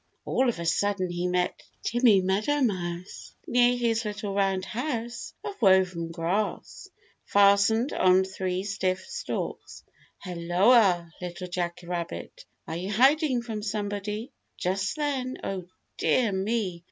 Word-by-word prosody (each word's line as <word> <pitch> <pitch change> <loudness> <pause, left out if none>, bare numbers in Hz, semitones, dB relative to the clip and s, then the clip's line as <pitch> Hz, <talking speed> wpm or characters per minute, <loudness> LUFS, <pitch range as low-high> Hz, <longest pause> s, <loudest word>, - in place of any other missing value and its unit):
All 260 -1 +2
of 235 - -2
a 170 - -5
sudden 185 +2 0
he 175 +1 -1
met 180 0 0 0.2
Timmy 235 -5 +4
Meadowmouse 190 -4 -1
near 245 0 +3
his 230 -1 +1
little 205 -1 -4
round 195 -1 +1
house 235 +1 -4
of 400 -9 -7
woven 185 -4 +3
grass, 175 +5 -3 0.3
fastened 205 +5 +4
on 185 0 +4
three 190 -1 -3
stiff 190 -2 -1
stalks. - - -5 0.4
"Helloa, 180 +1 +3
Little 180 +1 -5
Jack 175 0 -3
Rabbit. 175 - -5 0.2
Are 160 - -4
you 185 +3 -4
hiding 265 - +3
from 220 -3 -5
somebody?" 210 +2 -3 0.3
Just 190 +2 -1
then, 275 -4 -2
oh 185 -3 -4 0.3
dear 235 -5 +2
me! 195 -2 -1
200 Hz, 125 wpm, -27 LUFS, 180-230 Hz, 0.4 s, Timmy